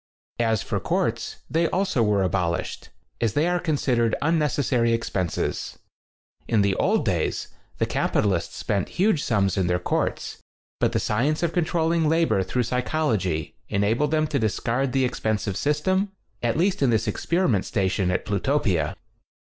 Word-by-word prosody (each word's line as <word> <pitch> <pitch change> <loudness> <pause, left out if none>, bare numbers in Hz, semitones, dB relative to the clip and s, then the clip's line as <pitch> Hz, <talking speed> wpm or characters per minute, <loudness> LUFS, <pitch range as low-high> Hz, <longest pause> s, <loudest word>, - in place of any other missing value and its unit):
As 110 -4 +1
for - - -2
courts, - - -1
they 165 +1 +1
also 185 -9 0
were 105 -3 +2
abolished, 90 -2 -2 0.3
as 115 -3 +1
they 150 +6 +2
are 180 0 +1
con 160 -4 0
sidered 120 -5 +1
unnecessary 145 -6 +1
expenses. 95 -6 -2 0.7
In 110 -3 +3
the 100 -1 +2
old - - +2
days, - - -1 0.3
the - - +1
capitalists 95 -5 0
spent 100 -3 -1
huge 185 -4 +3
sums 100 -5 +1
in 95 -2 +1
their 90 0 +2
courts, 90 - -2 0.4
but - - +1
the - - +2
science 140 +10 0
of 170 -1 0
controlling 165 -2 +1
labor 160 -11 +2
through 120 +7 -1
psychol 125 +3 0
ogy 80 -6 -2 0.2
enabled 110 +8 +1
them 155 0 +2
to 145 -2 -1
discard 115 +4 0
the 135 0 +2
ex 125 - -3
pensive 105 -3 -1
system, 185 - 0 0.3
at 120 +3 0
least 190 +2 +1
in 135 - +4
this 115 -1 +1
ex - - -3
periment 170 - +2
station 95 -2 0
at 90 - -1
Plutopia. 100 - 0
120 Hz, 160 wpm, -24 LUFS, 100-155 Hz, 0.7 s, in